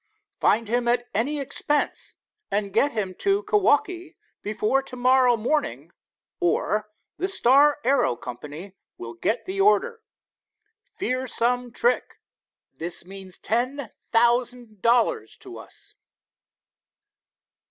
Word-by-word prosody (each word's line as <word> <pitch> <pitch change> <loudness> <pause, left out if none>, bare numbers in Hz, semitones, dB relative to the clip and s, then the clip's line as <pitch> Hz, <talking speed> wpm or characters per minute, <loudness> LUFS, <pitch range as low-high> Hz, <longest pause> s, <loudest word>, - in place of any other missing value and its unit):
Find 225 +1 +2
him 240 +2 0
at 240 0 +1
any 280 +8 0
expense, 290 +2 -2 0.3
and 200 -1 -2
get 285 - +3
him 205 -5 -3
to 400 +1 +1
Kewaukee 355 -3 +1 0.3
before 215 +5 0
to 265 - -11
morrow 250 -1 +4
morning, 290 +6 -2 0.5
or 350 - 0 0.3
the 375 - -1
Star 290 -4 +4
Aero 265 - +2
Co. 125 +1 -7 0.6
will 115 0 -8
get 215 - -2
the 385 +1 -2
order. 455 +3 +2 1.0
Fear 260 -8 -2
some 245 +1 -1
trick. 480 - 0 0.6
This 170 +1 -7
means 190 -1 -11
ten 245 +2 -2 0.2
thousand 240 -2 +1
dollars 235 0 +1
to 380 -3 -11
us." - - -16
250 Hz, 110 wpm, -24 LUFS, 220-295 Hz, 1.0 s, morrow